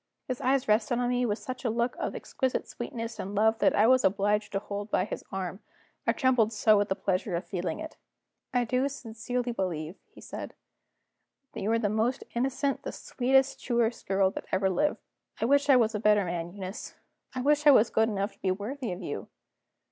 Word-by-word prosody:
His 255 -1 -3
eyes 265 0 +2
rested 220 +3 +2
on 245 0 0
me 245 0 +1
with 210 -1 0
such 255 +1 -7
a 240 - +1
look 235 +2 0
of - - -3
exquisite 260 -1 -2
sweetness 230 -1 -6
and 200 +2 -4
love 220 +2 +3
that - - +3
I 210 - +5
was 255 +2 +5
obliged 205 +2 +1
to - - +1
hold 205 +1 -5
by 185 - +1
his - - -6
arm, 190 -1 -4 0.5
I - - +6
trembled 250 -6 +2
so 215 0 +4
with 205 - 0
the 190 - +1
pleasure 185 -1 -1
of 170 - -3
feeling 175 -4 -3
it. 315 - -8 0.5
"I 245 -1 +1
do 255 +4 +1
sincerely 245 -1 -4
believe," 175 -5 -3
he - - -16
said, - - -7 1.0
"that - - -6
you 210 - 0
are 230 - +3
the 225 -2 +1
most 220 +5 0
innocent 270 +3 0
girl, - - -34
the - - -3
sweetest, 265 +1 +1
truest 235 -1 0
girl 195 0 +3
that - - -7
ever 190 0 +2
lived. 240 +12 +1 0.4
I - - +1
wish 285 +3 +3
I 275 - +8
was 230 -3 +3
a 210 - -1
better 210 -2 +4
man, 170 -1 -3
Eunice; 195 +1 -7 0.4
I 255 - -1
wish 295 +2 +3
I - - +11
was 230 -4 +5
good 220 +1 +3
enough 200 0 -2
to - - -29
be 190 - 0
worthy 225 +6 -3
of 180 +1 -6
you!" 145 - -5
220 Hz, 215 wpm, -28 LUFS, 195-250 Hz, 1.0 s, I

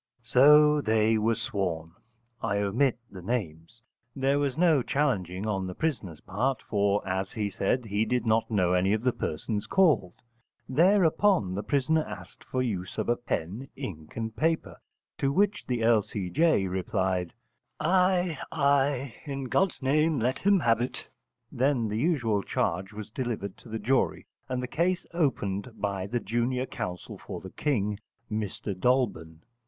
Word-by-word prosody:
So 150 +5 +6
they 110 -2 +2
were 115 +2 +2
sworn. 90 -7 -3 0.5
I 100 - 0
omit 115 +6 +1
the 95 -2 -9
names. 100 0 -4 0.3
There 135 +1 +1
was 140 -1 -1
no 165 -5 +4
challenging 105 - -1
on 95 -3 -1
the 90 - -6
prisoner's 100 - -3
part, 125 +8 -1
for, 100 -1 0
as 95 0 -2
he 105 -4 -2
said, 120 +6 0
he 105 0 0
did 125 -1 0
not 110 0 +2
know 90 -5 +2
any 95 +2 +2
of 110 +1 -1
the 125 - +3
persons 105 +3 -3
called. 155 - +3 0.5
Thereupon 170 - +3
the 100 - -2
prisoner 145 +5 +1
asked - - -10
for 130 - -2
the 130 - 0
use 95 -5 -4
of 120 - +1
pen, 100 +12 -3
ink, 85 - -7
and 110 -1 -4
paper, 160 +5 0 0.4
to 135 - +1
which 205 +6 +1
the 120 -3 -1
L. 115 -1 +5
C. 95 -3 -5
J. 160 -10 +3
replied: 95 -1 -1 0.5
'Ay, 180 -3 +2
ay, 140 -3 +1
in 140 -2 -4
God's 165 +5 0
name 150 +3 +2
let 125 +2 0
him 200 -2 +3
have 115 -3 +3
it.' 125 - -4 0.4
Then 130 -3 +1
the 105 +1 -2
usual 120 - +1
charge 95 +1 -1
was 105 -1 -8
delivered 115 -6 -3
to 120 - -15
the 110 - -3
jury, 125 +5 0 0.2
and 125 0 -2
the - - -3
case 175 +6 0
opened 125 - -1
by 100 -2 -2
the 120 +4 -1
junior 120 +4 -1
counsel 90 -8 -6
for - - -7
the 95 - -10
King, 105 -8 -1 0.3
Mr 105 -1 -3
Dolben. 90 -8 0
115 Hz, 160 wpm, -28 LUFS, 100-140 Hz, 0.5 s, So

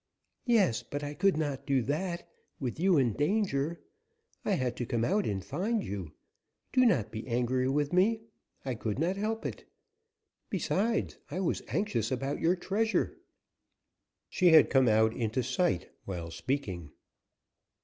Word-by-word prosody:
"Yes, 205 - +3
but 145 0 -5
I 145 0 -4
could 195 +1 +2
not 145 -4 -2
do 135 -3 +2
that, 170 +6 -2 0.3
with 130 0 -3
you 185 -1 +4
in 125 -5 +3
danger. 170 - 0 0.6
I 205 - +1
had 130 -8 0
to 120 - -2
come 115 -2 0
out 205 +7 +1
and 95 -2 -2
find 215 +3 -1
you. 95 -6 -5 0.6
Do 255 -1 +5
not 115 - +2
be 110 0 -6
angry 125 +2 +1
with 145 +2 0
me; 220 +5 +3 0.4
I 130 - -1
could 110 -2 -3
not 170 +6 +1
help 220 +3 -2
it. - - -6 0.8
Besides, 225 +3 0
I 170 - -3
was 190 - 0
anxious 125 - -1
about 135 +2 -2
your 170 +2 +3
treasure." 220 - 0 1.1
She 180 - +2
had 160 -2 +7
come 130 -2 +5
out 110 0 +4
into 115 +2 -1
sight, 125 - 0
while 85 -3 -5
speaking. 90 - -3
145 Hz, 150 wpm, -30 LUFS, 120-190 Hz, 1.1 s, had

